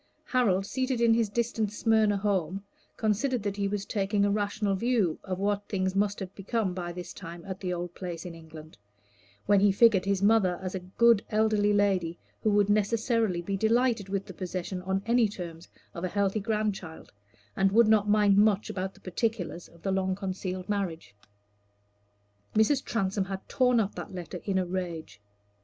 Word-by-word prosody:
Harold 200 Hz, -7 st, +2 dB
seated 255 Hz, +2 st, -1 dB
in 235 Hz, -1 st, +5 dB
his 225 Hz, -2 st, +2 dB
distant 225 Hz, -1 st, -1 dB
Smyrna 215 Hz, -1 st, +2 dB
home 195 Hz, -2 st, -1 dB, 0.3 s
considered 225 Hz, +2 st, 0 dB
that 205 Hz, -1 st, -3 dB
he 200 Hz, -1 st, 0 dB
was 200 Hz, 0 st, -3 dB
taking 200 Hz, -1 st, 0 dB
a 205 Hz, -, +2 dB
rational 205 Hz, 0 st, 0 dB
view 210 Hz, -5 st, +1 dB
of 185 Hz, -2 st, -3 dB
what 205 Hz, +1 st, -1 dB
things 190 Hz, -2 st, -1 dB
must 205 Hz, +1 st, +1 dB
have 190 Hz, -1 st, -6 dB
become 200 Hz, -1 st, -2 dB
by 175 Hz, -1 st, -4 dB
this 175 Hz, 0 st, -7 dB
time 170 Hz, -3 st, -9 dB
at 190 Hz, -1 st, -6 dB
the 180 Hz, -2 st, -3 dB
old 175 Hz, 0 st, -4 dB
place 175 Hz, -3 st, -6 dB
in 175 Hz, -, -6 dB
England, 160 Hz, -4 st, -12 dB, 0.7 s
when 205 Hz, -1 st, +4 dB
he 200 Hz, 0 st, +5 dB
figured 200 Hz, -2 st, +4 dB
his 200 Hz, -1 st, 0 dB
mother 200 Hz, -4 st, +4 dB
as 185 Hz, -1 st, -5 dB
a 190 Hz, -, -2 dB
good 205 Hz, +4 st, +3 dB
elderly 215 Hz, -1 st, +2 dB
lady, 190 Hz, -5 st, +1 dB, 0.2 s
who 215 Hz, -, +2 dB
would 205 Hz, -1 st, +3 dB
necessarily 215 Hz, -2 st, +1 dB
be 195 Hz, +3 st, -2 dB
delighted 225 Hz, 0 st, +1 dB
with 195 Hz, 0 st, -2 dB
the 190 Hz, -, -9 dB
possession 180 Hz, +1 st, -4 dB
on 190 Hz, +1 st, -2 dB
any 235 Hz, 0 st, +3 dB
terms 170 Hz, -4 st, -8 dB, 0.3 s
of 170 Hz, -, -7 dB
a -, -, +1 dB
healthy 200 Hz, +2 st, 0 dB
grandchild, 205 Hz, -5 st, -3 dB, 0.4 s
and 195 Hz, 0 st, +2 dB
would 230 Hz, +2 st, +5 dB
not 210 Hz, -1 st, +3 dB
mind 205 Hz, -1 st, +4 dB
much 210 Hz, 0 st, +3 dB
about 190 Hz, -1 st, -4 dB
the -, -, -18 dB
particulars 185 Hz, -2 st, -3 dB
of 170 Hz, +2 st, -21 dB
a 195 Hz, -, +1 dB
long 190 Hz, 0 st, 0 dB
concealed 185 Hz, -1 st, -4 dB
marriage. 190 Hz, -, -3 dB, 1.4 s
Mrs. 235 Hz, +6 st, +3 dB
Transome 195 Hz, -3 st, -1 dB
had 195 Hz, 0 st, -6 dB
torn 250 Hz, -3 st, +3 dB
up 205 Hz, -2 st, 0 dB
that -, -, -7 dB
letter 175 Hz, 0 st, -6 dB
in 195 Hz, -2 st, 0 dB
a 185 Hz, -, +1 dB
rage. 170 Hz, -, -5 dB
200 Hz, 185 wpm, -28 LUFS, 185-215 Hz, 1.4 s, in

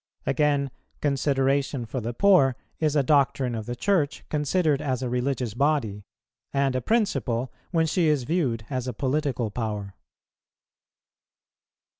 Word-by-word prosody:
Again, 145 Hz, -2 st, +1 dB, 0.3 s
consideration 140 Hz, -2 st, +1 dB
for 120 Hz, +3 st, -4 dB
the 115 Hz, +2 st, -3 dB
poor 140 Hz, -4 st, +4 dB, 0.2 s
is 155 Hz, -2 st, +1 dB
a 145 Hz, -, +4 dB
doctrine 135 Hz, -3 st, +2 dB
of 110 Hz, -2 st, -5 dB
the 120 Hz, -, -3 dB
Church 160 Hz, -1 st, 0 dB
considered 150 Hz, 0 st, +1 dB
as 130 Hz, -3 st, -1 dB
a 125 Hz, -, -1 dB
religious 125 Hz, -2 st, -1 dB
body, 120 Hz, -7 st, 0 dB, 0.5 s
and 140 Hz, -1 st, +1 dB
a 130 Hz, -, 0 dB
principle 130 Hz, -, 0 dB, 0.2 s
when 165 Hz, -2 st, +2 dB
she 165 Hz, +1 st, +1 dB
is 150 Hz, -4 st, +2 dB
viewed 125 Hz, -7 st, -1 dB
as 130 Hz, -1 st, -2 dB
a 125 Hz, -, -2 dB
political 130 Hz, -3 st, -1 dB
power. 105 Hz, -4 st, -4 dB
135 Hz, 135 wpm, -26 LUFS, 120-150 Hz, 0.5 s, poor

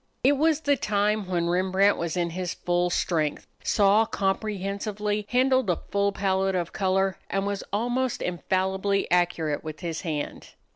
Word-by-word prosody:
It 270 Hz, -, +6 dB
was 310 Hz, +2 st, +2 dB
the 285 Hz, -2 st, +3 dB
time 210 Hz, -3 st, 0 dB
when 175 Hz, -2 st, 0 dB
Rembrandt 190 Hz, +3 st, +3 dB
was 170 Hz, +1 st, -3 dB
in 170 Hz, -1 st, 0 dB
his 180 Hz, 0 st, -3 dB
full 175 Hz, 0 st, 0 dB
strength, 160 Hz, -3 st, 0 dB, 0.2 s
saw 205 Hz, +1 st, +4 dB
comprehensively, 205 Hz, +1 st, -2 dB
handled 260 Hz, -2 st, +3 dB
a 175 Hz, -, +3 dB, 0.2 s
full 200 Hz, 0 st, +2 dB
palette 195 Hz, -1 st, 0 dB
of 175 Hz, -2 st, -2 dB
color, 190 Hz, 0 st, +1 dB
and 195 Hz, 0 st, -1 dB
was 200 Hz, -1 st, -2 dB
almost 245 Hz, +4 st, -1 dB
infallibly 190 Hz, +2 st, 0 dB
accurate 170 Hz, -4 st, +1 dB
with 155 Hz, +1 st, -7 dB
his 165 Hz, -2 st, -3 dB
hand. 155 Hz, -5 st, -5 dB
195 Hz, 150 wpm, -26 LUFS, 175-210 Hz, 0.2 s, It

